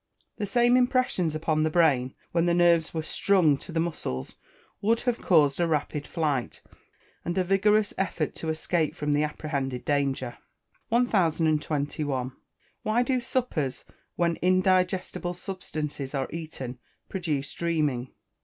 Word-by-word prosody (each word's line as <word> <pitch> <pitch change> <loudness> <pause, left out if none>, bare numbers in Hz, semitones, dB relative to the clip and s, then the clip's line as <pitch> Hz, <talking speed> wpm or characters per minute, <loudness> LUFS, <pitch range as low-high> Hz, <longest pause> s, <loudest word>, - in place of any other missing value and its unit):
The 205 - -2
same 240 +4 +4
impressions 245 - +2
upon 155 0 0
the 155 - +2
brain, 145 -6 +2 0.2
when 170 0 +2
the 170 - +3
nerves 170 -2 +4
were 160 -1 -3
"strung" 175 -3 +3
to 170 - -10
the 165 - -1
muscles, 110 - -3 0.5
would 225 +3 +2
have 245 -2 -1
caused 150 -5 +4
a 170 - +3
rapid 150 -1 -1
flight, 145 -7 -2 0.6
and 175 +2 -3
a 185 - +3
vigorous 205 +3 +3
effort 170 -5 -1
to 160 - -3
escape 160 0 0
from 150 0 -1
the 145 - +2
apprehended 140 -4 -3
danger. 135 -4 -1 0.5
1021. 155 - +1 0.5
_Why 235 +3 +2
do 255 -1 +1
suppers, 235 - -2 0.3
when 170 -1 +1
indigestible 185 -1 +1
substances 150 -7 -5
are 135 -1 -1
eaten, 145 -7 -6 0.3
produce 155 -7 -3
dreaming? 150 -7 -1
165 Hz, 135 wpm, -27 LUFS, 145-185 Hz, 0.6 s, same